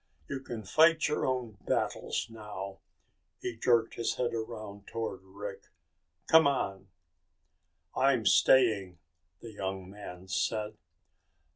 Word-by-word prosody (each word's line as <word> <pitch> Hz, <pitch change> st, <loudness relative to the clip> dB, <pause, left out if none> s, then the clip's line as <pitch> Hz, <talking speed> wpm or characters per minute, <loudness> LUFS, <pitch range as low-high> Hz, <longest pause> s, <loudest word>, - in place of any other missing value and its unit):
You 135 Hz, -, -3 dB
can 120 Hz, -4 st, -7 dB
fight 160 Hz, -, +5 dB
your 150 Hz, -, 0 dB
own 120 Hz, -6 st, -2 dB
battles -, -, 0 dB
now." 105 Hz, -4 st, -7 dB, 0.6 s
He 120 Hz, -, -4 dB
jerked 115 Hz, 0 st, +2 dB
his 115 Hz, -, -1 dB
head 125 Hz, -2 st, -1 dB
around 110 Hz, -3 st, -6 dB
toward 110 Hz, -4 st, -4 dB
Rick. 100 Hz, +1 st, -8 dB, 0.6 s
"C'mon!" 130 Hz, -12 st, +4 dB, 1.1 s
"I'm 130 Hz, -4 st, +3 dB
staying," 105 Hz, -10 st, +4 dB, 0.4 s
the 115 Hz, -, -9 dB
young 95 Hz, -2 st, -5 dB
man 95 Hz, -3 st, -9 dB
said. 105 Hz, +2 st, -1 dB
110 Hz, 110 wpm, -31 LUFS, 100-125 Hz, 1.1 s, fight